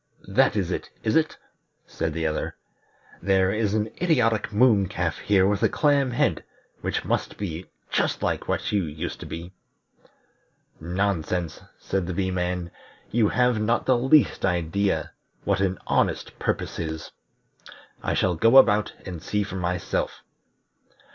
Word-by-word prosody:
that - - +3
is - - 0
it, - - -3
is 110 - +1
it?" 160 -1 +2 0.5
said 80 0 -3
the 80 +1 -3
other. 75 -1 -2 0.7
"There 95 -1 +3
is 105 -1 0
an 110 0 -1
idiotic 120 - +2
moon 105 -3 +4
calf 90 -5 -2
here 95 -2 +3
with 100 0 0
a - - +4
clam 145 -3 +2
head, 120 - +1 0.4
which - - -2
must - - -1
be 90 -3 -5 0.2
just - - 0
like - - -1
what - - -1
you 100 -2 +2
used 75 0 -5
to - - -8
be." 85 +3 -7 1.3
"Nonsense," 90 -1 -1 0.2
said 95 -3 -2
the 90 - -3
Bee 95 0 0
man. 90 -1 -2 0.4
"You 110 -2 +3
have 125 -3 +2
not 115 +3 +1
the 130 - +4
least 130 0 +3
idea 95 +2 0 0.3
what 100 -1 +1
an 95 -1 0
honest - - 0
purpose - - -2
is. 80 -1 -5 0.9
I - - -1
shall 95 - +2
go 115 +10 +5
about, 105 -5 +5
and 90 -4 -6
see 105 +4 -1
for 95 -1 -6
myself." 90 0 -2
95 Hz, 150 wpm, -25 LUFS, 90-110 Hz, 1.3 s, go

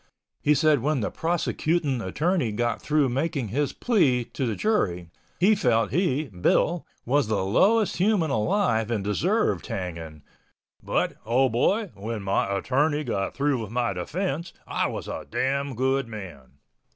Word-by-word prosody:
He 150 - +3
said 150 0 +4
when 145 -1 0
the 105 - -2
"prosecutin'" 160 -4 0
attorney 150 - 0
got 120 +2 -1
through 150 -2 +2
making 135 -2 -1
his 145 +6 0
plea 145 - +2
to 130 - -1
the 110 - -1
jury, 90 - 0 0.3
he 195 +5 +5
felt 115 - +2
he 155 -5 +1
(Bill) 110 - +1 0.2
was 140 0 +2
the 105 -3 0
lowest 205 - +3
human 185 -5 +2
alive 115 - +1
and 110 -4 -1
deserved 100 -3 0
hanging, 80 -5 -6 0.6
"but, - - -1
oh 130 +4 +2
boy, 190 - +1
when 105 +1 -5
my 95 0 0
attorney 145 +9 +1
got 100 -7 -2
through 140 -3 +1
with 110 - -6
my 120 -2 0
defense, 165 - -3
I - - 0
was - - -5
a - - -6
damn 140 - -1
good 130 +1 +1
man!" 85 - -9
130 Hz, 150 wpm, -25 LUFS, 105-155 Hz, 0.6 s, he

